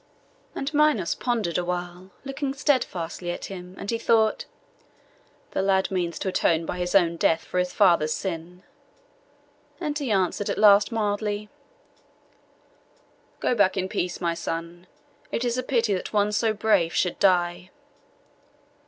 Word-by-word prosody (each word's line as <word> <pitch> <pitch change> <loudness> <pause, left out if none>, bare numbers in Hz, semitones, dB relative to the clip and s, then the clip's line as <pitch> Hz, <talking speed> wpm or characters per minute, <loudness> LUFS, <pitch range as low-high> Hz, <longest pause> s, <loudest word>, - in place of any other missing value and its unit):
And 275 +3 -3
Minos 295 - +3
pondered 220 -9 -1
awhile, 180 +1 -4 0.2
looking 275 0 -3
steadfastly 185 - -1
at 175 - -4
him, 180 0 -9
and 200 - -4
he 230 - -1
thought, 220 -1 +2 1.1
'The - - -1
lad 190 0 +1
means 175 -3 -1
to 190 - -2
atone 165 -3 +1
by 180 - -4
his 180 +2 -2
own 170 -3 +4
death 165 0 +2
for 180 - -2
his 180 0 0
father's 170 -6 +3
sin;' 180 0 -5 1.2
and 300 -4 -3
he 280 -4 -3
answered 195 0 0
at - - -2
last 205 +1 +6
mildly— 210 -1 -2 1.9
'Go - - +2
back 200 -4 +2
in 185 0 0
peace, 180 -1 -3
my 170 -2 0
son. 170 +1 -5 0.4
It 240 - -1
is 240 -1 0
a 255 - 0
pity 235 -4 +1
that 185 - -3
one 210 -1 +2
so 220 +1 +1
brave 205 -6 +1
should 180 - 0
die. 180 -1 +2
190 Hz, 145 wpm, -25 LUFS, 175-220 Hz, 1.9 s, last